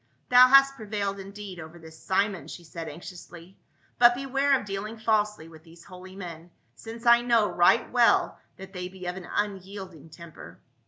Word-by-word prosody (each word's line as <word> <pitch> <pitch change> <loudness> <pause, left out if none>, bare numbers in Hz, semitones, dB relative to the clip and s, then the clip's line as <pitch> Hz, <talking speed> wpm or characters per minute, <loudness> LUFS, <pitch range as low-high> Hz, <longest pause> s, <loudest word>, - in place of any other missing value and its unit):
" - - -43
Thou 250 +1 +8
hast 275 +1 +5
prevailed 200 -2 -4
indeed 195 -1 -9
over 160 +1 -11
this 160 -1 -15
Simon," 190 -5 -1
she 175 - -10
said 165 -1 -8
anxiously, 175 +2 -12 0.2
" - - -38
but 240 0 +6
beware 275 +1 +1
of - - -10
dealing 205 +3 -6
falsely 210 -6 -1
with 160 -1 -15
these 165 0 -17
holy 185 0 -13
men, 170 -3 -9 0.2
since 230 +1 -11
I 235 0 +6
know 235 -3 +2
right 180 +6 +3
well 240 -1 +2 0.2
that 190 +1 -12
they 180 -1 -5
be 185 0 -11
of 180 0 -4
an 185 -2 -10
unyielding 190 -5 -5
temper." 165 0 -13
195 Hz, 180 wpm, -26 LUFS, 175-225 Hz, 0.2 s, Thou